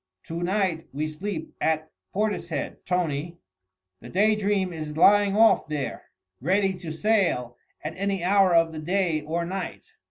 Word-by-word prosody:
To 165 +1 -5
night 185 -3 0
we 150 +3 -2
sleep 160 +2 -5
at 155 0 0 0.2
Portishead, 210 +1 -2
Tony. 170 -2 -1 0.6
The - - -11
Day 210 +4 +3
Dream 200 -3 0
is 155 -2 -6
lying 205 +3 +5
off 220 -6 +5
there, 150 -3 -4 0.4
ready 190 +6 +2
to 170 -3 -6
sail 165 - +1 0.3
at 155 - -4
any 195 -2 -1
hour 195 0 +4
of 165 -1 +4
the 155 - -6
day 170 -1 0
or 165 +3 -2
night. 190 - -6
175 Hz, 150 wpm, -26 LUFS, 155-200 Hz, 0.6 s, lying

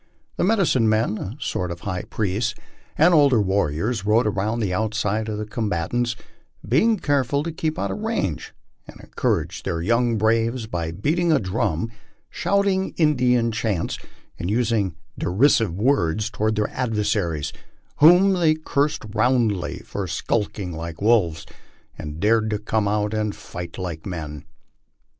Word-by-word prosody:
The - - +1
medicine 175 - +3
men, 110 0 +1
a 100 +6 -5
sort 90 -10 -2
of 85 0 -6
high 90 -3 -3
priests, 110 +2 -1 0.4
and 170 +4 +5
older 140 -6 +5
warriors 100 +2 0
rode 110 +4 +3
around 105 +3 -1
outside 110 +2 -1
of 105 - -3
the 105 - -3
combatants, 110 +3 -1 0.5
being 215 - +3
care 145 -6 +1
ful 140 +4 -1
to 165 - -3
keep 160 0 -2
out - - -2
of - - -4
range, 210 - -2 0.4
and - - -13
encouraged - - -2
their 85 - -2
young 115 +5 +1
braves 115 +2 +1
by 85 -6 -3
beating 160 - 0
a 155 - +4
drum, 95 0 -1 0.4
shouting 200 -1 0
Indian 125 -7 +3
chants, 110 -6 -2 0.4
and 85 - -3
using 110 -5 +1 0.2
derisive 105 - +3
words 110 - +1
toward 110 +1 0
their 105 0 0
adversa 105 -7 -1
ries, 75 +1 -4 0.4
whom 180 +6 +7
they 165 -4 +3
cursed 145 -4 -1
roundly 115 -4 +1
for 100 -2 -4
skulking 95 +2 -2
like 85 0 -6
wolves, 100 -7 +2 0.5
and 75 +1 -7
dared 110 +2 +2
to 105 - 0
come 105 0 -1
out 105 +1 0
and 105 -2 -1
fight 85 -1 -8
like 85 -3 -5
men. 75 -5 -6
110 Hz, 150 wpm, -23 LUFS, 95-125 Hz, 0.5 s, whom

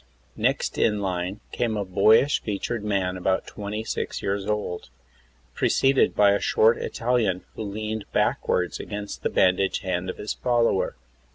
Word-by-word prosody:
Next - - 0
in 105 -2 +2
line 95 0 -3
came 115 -3 -1
a 100 - -2
boyish 110 +9 +4
featured 105 +2 -3
man 95 -3 0
about 95 +1 0
26 105 +2 -4
years 100 0 -2
old, 105 -4 -3 0.6
preceded 135 0 +2
by 100 -1 +5
a 100 - +2
short 110 +2 +3
Italian 115 -6 0
who - - -7
leaned 110 +1 -4
backward 90 -1 +1
against 105 -1 -6
the - - 0
bandaged 95 +1 +2
hand 90 -1 -2
of - - -5
his 105 - -3
follower. 120 -5 +1
100 Hz, 145 wpm, -25 LUFS, 95-110 Hz, 0.6 s, by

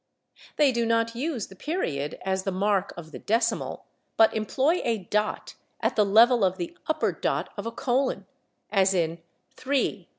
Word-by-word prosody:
They 290 -3 +4
do 235 -1 0
not 230 0 +1
use 255 -3 -2
the 195 - -14
period 160 - -3
as 190 0 0
the 195 - -2
mark 200 +1 +1
of 160 -2 -9
the - - -8
decimal, 230 +1 -1 0.3
but 225 - +6
employ 265 +10 +1
a 230 -2 +1
dot 210 +2 -2 0.3
at - - 0
the 215 - +4
level 225 +3 +5
of 185 0 +2
the 175 -2 -5
upper 315 - +1
dot - - -2
of - - -5
a - - -3
colon, 250 -5 -1 0.5
as 195 -2 +3
in 165 -1 0 0.4
/3·1416 255 -9 -1
215 Hz, 170 wpm, -26 LUFS, 190-245 Hz, 0.5 s, but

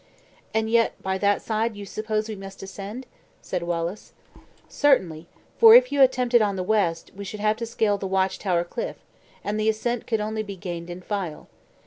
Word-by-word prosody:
"And 220 0 0
yet 230 0 +2
by 190 0 -1
that 205 0 +2
side 220 0 -1
you 205 0 -7
suppose 215 +2 -2
we 220 - -5
must 195 0 -10
ascend?" 200 +6 -7 0.3
said - - -4
Wallace. 170 +3 -3 0.5
"Certainly; 170 - +2 0.3
for 455 -1 +10
if - - +6
you 285 - +2
attempt 255 -2 +3
it 240 - +7
on 205 -2 +1
the 185 - -2
west, 185 -5 0
we 200 - -7
should 205 +2 -7
have 215 +1 +1
to 230 -1 -4
scale 215 -3 +1
the 195 - -3
watch 190 0 0
tower 175 -4 +1
cliff, 175 +7 -5 0.5
and 210 +1 -2
the 215 +1 +2
ascent 235 +2 -2
could 225 -2 0
only 215 +1 -2
be 205 -2 -7
gained 175 -2 -6
in 175 +1 -7
file. 185 -5 -4
210 Hz, 195 wpm, -24 LUFS, 190-220 Hz, 0.5 s, for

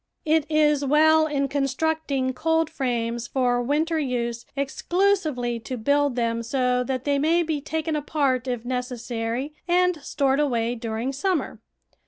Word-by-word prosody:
It 315 0 +2
is 300 -2 +3
well 315 +3 +4
in 280 -2 0
constructing 275 -1 -1
coldframes 250 -7 -1
for 245 -2 +1
winter 310 +6 0
use 235 -4 -2
exclusively 285 -4 0
to 245 +3 -6
build 285 +3 +1
them 230 -1 0
so 250 +1 0
that 255 0 -2
they 285 0 +1
may 330 +4 +3
be 310 -3 -2
taken 315 +1 -2
apart 280 -4 0
if 245 -2 -3
necessary 245 +1 -3
and 355 -2 +2
stored 275 -1 0
away 240 -5 +1
during 230 +2 -3
summer. 280 - -1
275 Hz, 135 wpm, -24 LUFS, 245-310 Hz, -, well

